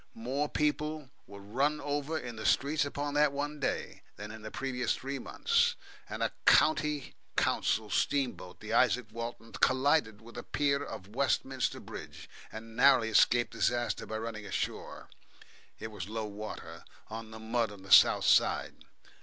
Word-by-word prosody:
More 135 +6 -2
people 150 -1 -1 0.2
were 100 0 -11
run 135 +10 0
over 145 +2 -2
in 120 -6 -6
the 110 - -7
streets 145 +3 +2
upon 145 0 -3
that 150 0 +4
one 145 +1 -4
day, 135 - -3
than 105 +2 -8
in 110 0 -10
the 110 - -7
previous 125 0 -1
three 135 +1 -5
months, 475 +1 +1 0.3
and - - -3
a - - -1
County 150 -2 +3 0.2
Council 110 0 +1
steamboat, 125 -10 -1
the 110 +1 -5
Isaac 125 0 +3
Walton, 115 0 -6
collided 130 -5 +2
with 120 +1 -10
a - - -7
pier 140 -1 0
of 100 -4 -9
Westminster 135 -1 0
Bridge, - - -10 0.2
and 115 +1 -9
narrowly 125 -3 +5
escaped 120 +2 +4
disaster 120 -1 -1
by 110 - -3
running 110 -1 -5
ashore - - -4 0.7
it 110 - -7
was 100 -3 -7
low 110 0 -3
water 100 -5 -8 0.2
on 110 0 -7
the 110 - -9
mud 115 0 -1
on 100 -2 -12
the 95 - -11
south - - +7
side. - - +3
120 Hz, 160 wpm, -31 LUFS, 110-145 Hz, 0.7 s, south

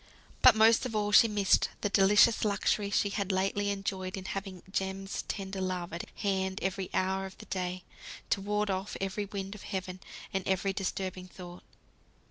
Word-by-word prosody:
But - - +8
most 225 +3 +5
of 225 - -7
all 210 -1 0
she 230 - +8
missed 205 -3 +3
the - - +1
delicious 200 +3 +5
luxury 205 0 +1
she 200 0 +1
had 200 0 -1
lately 195 +2 0
enjoyed 195 -2 -3
in 190 - -7
having 195 -2 -5
Jem's 195 0 -3
tender 195 -1 -4
love 180 -2 -3
at 170 - -5
hand 190 -2 -1
every 190 0 -2
hour 190 +1 0
of 190 - -14
the - - -11
day, 180 -1 -3 0.5
to 195 - +2
ward 210 +1 0
off 190 +2 -3
every 195 +2 -2
wind 195 0 -5
of 210 - -10
heaven, 185 -1 -5 0.3
and 195 - 0
every 190 +1 +1
disturbing 185 -1 -3
thought. 180 -1 -11
195 Hz, 175 wpm, -30 LUFS, 190-205 Hz, 0.5 s, But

